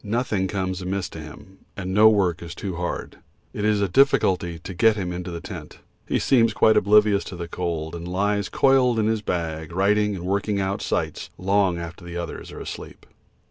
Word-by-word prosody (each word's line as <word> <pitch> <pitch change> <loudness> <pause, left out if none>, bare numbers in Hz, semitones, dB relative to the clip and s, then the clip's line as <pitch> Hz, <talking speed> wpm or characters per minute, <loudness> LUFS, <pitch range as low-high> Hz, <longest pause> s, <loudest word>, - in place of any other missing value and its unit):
Nothing 105 -3 -1
comes 95 -1 -2
amiss 95 0 -2
to 80 - -9
him, 85 +5 -12 0.2
and 95 -1 -4
no 110 +2 +7
work 95 -5 +1
is 85 0 -8
too 95 -3 -5
hard. 90 0 -4 0.3
It 105 - -4
is 105 -1 +2
a 100 - +2
difficulty 90 -7 +2
to 85 +3 -8
get 110 +5 +4
him 90 -4 -3
into 90 +1 -5
the 85 -1 -5
tent; - - -9 0.3
he - - +1
seems 115 -4 +3
quite 110 0 +5
oblivious 105 0 +4
of 90 - -7
the 85 -1 -5
cold, 85 -2 -3
and 85 0 -6
he - - -6
lies 100 +2 0
coiled 130 -3 +3
in 110 - +2
his 110 -1 +1
bag 80 -4 -3
writing 105 +3 +2
and 90 -1 -6
working 100 +2 0
out 100 +2 -1
sights - - -2
long 95 -1 +2
after 85 +1 -7
the 85 0 -7
others 85 -1 -6
are - - -9
asleep. - - -8
95 Hz, 205 wpm, -24 LUFS, 85-105 Hz, 0.3 s, no